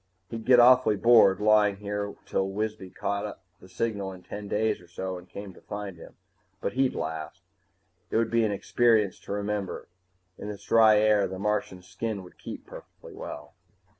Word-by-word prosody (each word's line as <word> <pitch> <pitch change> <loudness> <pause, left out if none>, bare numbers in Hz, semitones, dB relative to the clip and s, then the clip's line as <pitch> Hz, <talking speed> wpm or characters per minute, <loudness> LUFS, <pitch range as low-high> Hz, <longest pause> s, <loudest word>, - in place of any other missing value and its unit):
He'd 115 -1 -6
get 125 -1 +6
awfully 125 -2 +6
bored, 110 -3 +6
lying 105 -1 +4
here 100 0 -4
till 95 0 -1
Wisby 105 -1 -4
caught 100 +2 -4 0.2
the 95 - -16
signal 100 -1 -2
in 90 -1 -13
ten 105 0 -7
days 110 0 0
or 90 - -17
so 95 +2 -5
and 90 0 -11
came 100 -1 -8
to - - -17
find 100 -2 -6
him, 85 - -13 0.4
but - - -3
he'd 130 0 +1
last. 80 +3 -5 0.7
It - - 0
would 115 0 +1
be 115 0 +3
an 110 - +1
experience 110 0 +2
to - - -10
remember. 100 -2 -3 0.5
In 105 - -6
this 100 -1 -8
dry 110 -1 +6
air, 105 -2 +4
the 95 - -6
Martian's 100 -2 -2
skin 110 -1 -4
would 90 - -16
keep - - -8
perfectly - - -13
well. 455 +6 -8
105 Hz, 180 wpm, -27 LUFS, 95-110 Hz, 0.7 s, get